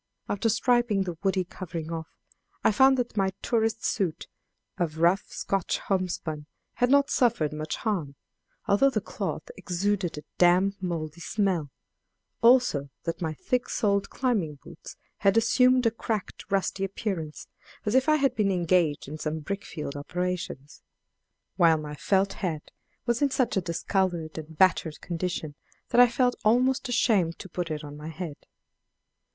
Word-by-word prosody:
After 205 +3 0
stripping 240 -3 +2
the 175 -3 -4
woody 190 -1 +1
covering 170 -3 -6
off, 160 -1 -4 0.6
I - - +5
found 265 +4 +5
that 245 -3 -2
my 190 -2 +1
tourist 225 -1 0
suit 185 -7 -1 0.5
of 160 -3 -1
rough 175 +4 +3
Scotch 195 -3 -1
homespun 170 -6 -2 0.3
had 245 - +1
not 280 +1 +4
suffered 230 - +2
much 155 0 -3
harm, 170 -11 -2 0.5
although 205 +8 +5
the 230 - 0
cloth 465 - -5
exuded 185 -2 -1
a 150 - -7 0.2
damp, 185 +3 +4
moldy 170 -2 -4
smell; 185 -7 0 0.7
also 235 - +4
that 165 +1 -4
my 160 -2 -2
thick 250 - -1
soled 200 -3 +1
climbing 210 - 0
boots - - -11 0.2
had 195 +1 +3
assumed 250 +2 +4
a 230 - +4
cracked 220 -2 -4
rusty 195 0 0
appearance 185 -5 -4 0.4
as 210 - 0
if 260 +3 +3
I 305 - +6
had 280 -3 +2
been 205 -2 +2
engaged 170 -5 +1
in 155 +2 -7
some 155 +1 -3
brick 200 +6 -4
field 150 -3 -6
operations; 180 -2 -4 0.8
while 165 -2 +5
my 150 -1 -6
felt 195 +6 +1
hat 160 -6 -3 0.3
was 240 +1 0
in 285 - +4
such 255 -3 0
a 190 - +2
discolored 170 -1 -1
and 160 0 -10
battered 170 -4 +3
condition 170 -3 -3 0.4
that 245 0 +6
I 245 - +8
felt 250 +1 +2
almost 250 +4 +3
ashamed 205 -9 +2
to - - -8
put 175 0 -3
it 155 -1 -4
on 145 0 -8
my 150 +1 -8
head. 160 -2 -7
190 Hz, 155 wpm, -27 LUFS, 160-225 Hz, 0.8 s, I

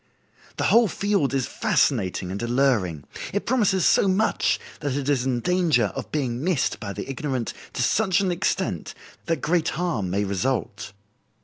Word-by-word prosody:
The - - -1
whole 235 -1 +5
field 200 -7 0
is 135 -2 0
fascinating 95 -7 0
and 100 - -4
alluring. 120 - +1 0.3
It 205 - -1
promises 205 -7 +2
so - - +4
much 200 +3 +1 0.2
that 145 -3 -2
it 140 -1 -2
is 135 -3 +1
in 125 -2 0
danger 160 - +2
of - - -6
being 130 -4 -2
missed 175 -6 0
by 105 -3 -5
the - - -6
ignorant 135 -3 -3 0.2
to - - -1
such 195 - +2
an 190 -2 +1
extent 175 +2 -2 0.3
that 165 -5 0
great 165 0 +1
harm 160 - -1
may 100 +3 0
result. 100 +1 -2
135 Hz, 165 wpm, -24 LUFS, 120-180 Hz, 0.3 s, whole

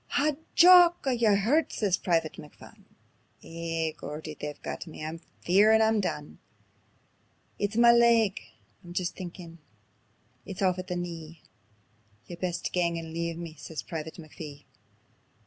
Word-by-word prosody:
"Haw, 300 +2 +3 0.2
Jock! 350 -1 +7
Are 265 - +2
ye 235 -2 +1
hurtit?" 220 +10 +2
says 200 -4 +1
Private 165 -4 0
McPhun. 150 - -14 0.6
"Ay, 165 -1 -3
Geordie, 155 +1 -7
they've 150 -1 -7
got - - -6
me; 155 -1 -8
I'm 160 +1 -6 0.3
fearin' 210 +5 +5
I'm 220 -1 +3
done. 150 -6 -5 1.2
It's 205 +1 -1
ma 235 0 +7
leg; 235 -4 +4 0.4
I'm 175 0 -10
jist 180 0 -2
thinkin' 175 -2 -9 0.8
it's 195 -1 -5
aff 185 -1 +2
at 185 - -6
the 180 - -3
knee; 165 -2 -7 0.8
Ye'd 175 -1 -10
best 180 -2 -3
gang 170 -2 +1
and 165 -1 -7
leave 170 0 -3
me," 170 -2 -7
says 160 0 -7
Private 160 -1 -6
McPhee. 155 -3 -10
175 Hz, 145 wpm, -28 LUFS, 165-210 Hz, 1.2 s, Jock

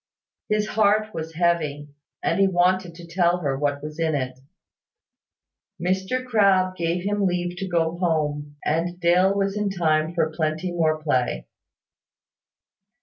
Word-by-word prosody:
His 210 0 +1
heart 215 0 +2
was 160 0 -6
heavy, 155 -4 0 0.3
and - - +1
he 195 - +5
wanted 180 -1 +1
to 170 0 -11
tell 175 +1 +2
her 140 -4 0
what 145 +1 -1
was 150 +1 -7
in 160 -2 +1
it. 130 -2 -3 1.4
Mr 190 +8 -1
Crabbe 195 -6 +3
gave 170 0 -1
him 205 0 +1
leave 175 0 -2
to 195 - -3
go 170 -1 0
home; 150 -4 -1
and 170 +3 -1
Dale 180 +2 +4
was 195 0 0
in 210 -1 0
time 160 -3 0
for 160 -2 +1
plenty 155 +2 -1
more 160 -2 +1
play. 130 - -1
175 Hz, 145 wpm, -24 LUFS, 155-190 Hz, 1.4 s, he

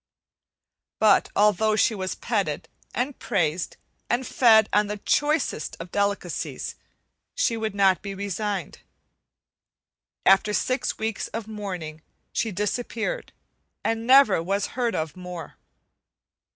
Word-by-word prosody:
But 215 -2 +4
although 210 +1 +3
she 220 +2 +3
was 190 -2 -3
petted, - - -2 0.2
and 255 +3 -2
praised, 165 -1 -1 0.3
and 250 +2 +1
fed 220 -5 +5
on 210 0 +4
the 210 +1 -4
choicest 295 - 0
of 170 +1 -8
delicacies, 200 0 -2 0.6
she 380 - +1
would 220 -2 -3
not 195 -2 +4
be 200 -1 -6
resigned. 200 -2 -3 1.5
After 195 +2 +5
six 255 +3 0
weeks 220 -1 -2
of 225 -1 -6
mourning, 180 -8 -6 0.3
she 225 - 0
disappeared, 225 - -2 0.5
and 225 +1 -1
never 260 -9 +6
was 195 +4 -1
heard 240 -5 0
of 155 -2 -3
more. 180 -2 -8
210 Hz, 115 wpm, -25 LUFS, 190-225 Hz, 1.5 s, never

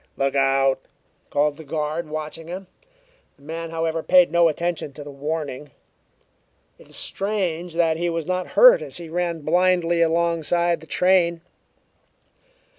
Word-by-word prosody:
"Look 135 0 0
out!" 135 -1 +2 0.5
called 145 0 +1
the 160 - -10
guard, 155 +1 -3
watching 155 +1 -6
him. 185 +3 -7 0.7
The 140 - -24
man, 165 +2 -6
however, 165 0 -2
paid 180 -1 +5
no 170 0 +4
attention 165 -2 -2
to 145 - -9
the 145 - -9
warning. 145 0 -5 1.1
It - - -17
is - - -7
strange 180 -5 -2
that 165 -2 +2
he 175 +1 -1
was 165 -2 -3
not 185 +1 -3
hurt - - +8
as - - -6
he 170 -2 -8
ran 170 -1 -2
blindly 175 +1 +2
alongside 170 0 +1
the 160 - -15
train. 175 -2 +2
165 Hz, 145 wpm, -23 LUFS, 155-175 Hz, 1.1 s, hurt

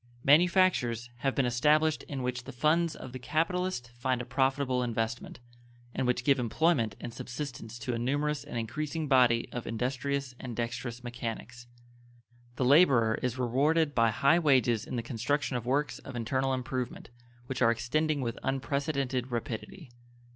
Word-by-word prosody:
Manufactures 145 - +3
have 135 +2 -1
been 135 - +2
established 150 +6 +3
in 135 -3 -4
which 125 0 -3
the 135 - -7
funds 155 +5 +1
of 130 - -9
the 130 - -7
capitalist 165 -2 -1
find 125 +1 -1
a 125 - -4
profitable 135 -1 +1
investment, 115 0 -3 0.5
and 130 - -1
which 125 0 +1
give 140 0 +3
employment 120 - +1
and 120 - -7
subsistence 120 -2 -6
to 120 +1 -3
a 115 - -2
numerous 145 +4 -1
and - - -6
increasing 150 +7 -3
body 125 -4 +4
of 120 - -5
industrious 130 +3 -2
and 125 -3 -6
dexterous 120 +1 -4
mechanics. 120 0 -6 0.9
The 125 - 0
laborer 130 -6 +5
is 125 -1 -2
rewarded 145 +5 +2
by 115 -3 +4
high 140 +9 +3
wages 130 -8 +3
in - - -5
the 120 - -2
construction 130 +3 -1
of 120 -1 -3
works 140 +1 0
of - - -10
internal 130 +3 0
improvement, 125 -2 -4 0.3
which 130 +1 -5
are 115 - +6
extending 145 +6 0
with 115 -3 -3
unprecedented 135 -2 -1
rapidity. 125 - -5
130 Hz, 155 wpm, -30 LUFS, 120-145 Hz, 0.9 s, are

